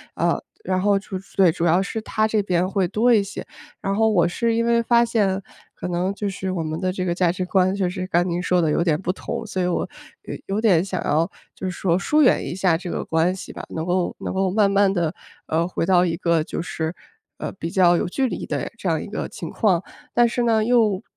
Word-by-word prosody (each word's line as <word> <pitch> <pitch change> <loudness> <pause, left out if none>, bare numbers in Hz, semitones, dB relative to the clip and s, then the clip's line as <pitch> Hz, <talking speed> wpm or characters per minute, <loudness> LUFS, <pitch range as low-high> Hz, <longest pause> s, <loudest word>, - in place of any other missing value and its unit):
呃， - - +1 0.2
然 185 0 0
后 205 0 +3
就 - - -18 0.3
对， 185 -3 +6
主 165 +2 -2
要 175 +3 +4
是 220 +3 -3
他 215 0 0
这 215 -1 +1
边 180 -1 +1
会 195 -2 +1
多 235 +6 +3
一 210 -3 +4
些。 200 - -7 0.4
然 195 0 -1
后 220 +1 +3
我 175 -5 +3
是 230 +5 0
因 230 0 +1
为 235 0 +3
发 235 0 +4
现， 200 -4 +1 0.3
可 - - -5
能 180 +2 0
就 205 0 -3
是 190 -1 -4
我 175 -3 -2
们 155 +1 -3
的 185 - 0
这 185 0 -3
个 175 - 0
价 175 -1 +2
值 185 0 -3
观 185 0 +2
就 190 -3 0
是 185 0 -4
刚 175 0 +2
您 175 0 -1
说 180 0 +2
得 155 -2 +1
有 170 - +2
点 160 -2 +1
不 180 - -1
同， 230 +3 -5
所 195 -4 -3
以 180 - +1
我 180 - -1 0.4
有 - - -6 0.2
有 215 - 0
点 185 -7 +4
想 190 -2 -3
要 160 +4 +1 0.2
就 190 - -5
是 185 - -2
说 175 0 0
疏 305 +8 +2
远 255 - +4
一 - - -4
下 185 -4 +2
这 180 0 -7
个 - - -3
关 165 +3 +1
系 190 - -8
吧， - - -7
能 160 - -4
够 180 0 0
能 - - -4
够 190 0 +1
慢 205 +1 +3
慢 200 0 +4
地， 170 -3 0 0.3
呃， 165 +2 +1
回 180 - -2
到 180 -1 +4
一 165 -1 -1
个 170 -2 +1
就 - - -4
是， 160 0 -4 0.4
呃， - - -4
比 165 -3 -5
较 175 -1 +4
有 - - -1
距 265 +9 0
离 - - -4
的 - - -3
这 - - -5
样 - - +1
一 - - -6
个 - - -4
情 - - -7
况。 190 -6 +2 0.3
但 240 0 +5
是 240 +1 -1
呢， 225 -2 +3
又 225 -5 +2
185 Hz, 270 characters per minute, -22 LUFS, 175-205 Hz, 0.4 s, 对